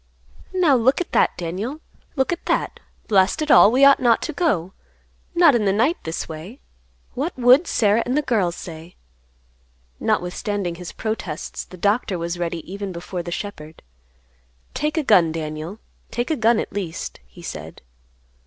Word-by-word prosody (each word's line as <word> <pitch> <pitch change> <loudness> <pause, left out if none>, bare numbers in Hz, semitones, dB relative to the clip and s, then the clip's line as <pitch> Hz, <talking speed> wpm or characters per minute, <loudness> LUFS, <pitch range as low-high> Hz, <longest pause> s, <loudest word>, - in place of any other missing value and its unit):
"Now, 355 -7 +3
look 250 +2 +3
at 360 - -4
that, - - +2
Daniel! 195 - -4 0.4
Look 265 +1 +1
at 345 - -8
that. - - 0 0.3
Blast 195 +6 +3
it 305 - 0
all; 210 - +8
we 265 +3 +5
ought 280 0 +7
not 235 -2 +2
go; 190 - 0 0.6
not 340 -4 +6
in 230 -3 +1
the 195 - +3
night 240 - +2
this 160 +1 -4
way. 165 - -9 0.5
What 280 +6 -3
would 255 +7 +5
Sarah 210 +1 +2
and 250 +3 -1
the 300 - +1
girls 195 -10 0
say?" 165 0 -10 1.0
Notwithstanding 180 +1 -1
his 170 0 -8
protests, 215 -8 -5
the 185 - -13
doctor 205 +1 +1
was 170 +1 -4
ready 170 -1 -3
even 200 0 -5
before 175 +1 -5
the 175 0 -7
shepherd. 160 -5 -7 0.9
"Take 300 +2 -2
a 315 - +2
gun, 180 - +5
Daniel; 155 +4 -5 0.3
take 240 +5 -2
a - - +2
gun, 230 -2 +3
at - - -4
least," 185 -5 -5
he 60 - -15
said. - - -8
205 Hz, 160 wpm, -22 LUFS, 170-255 Hz, 1.0 s, all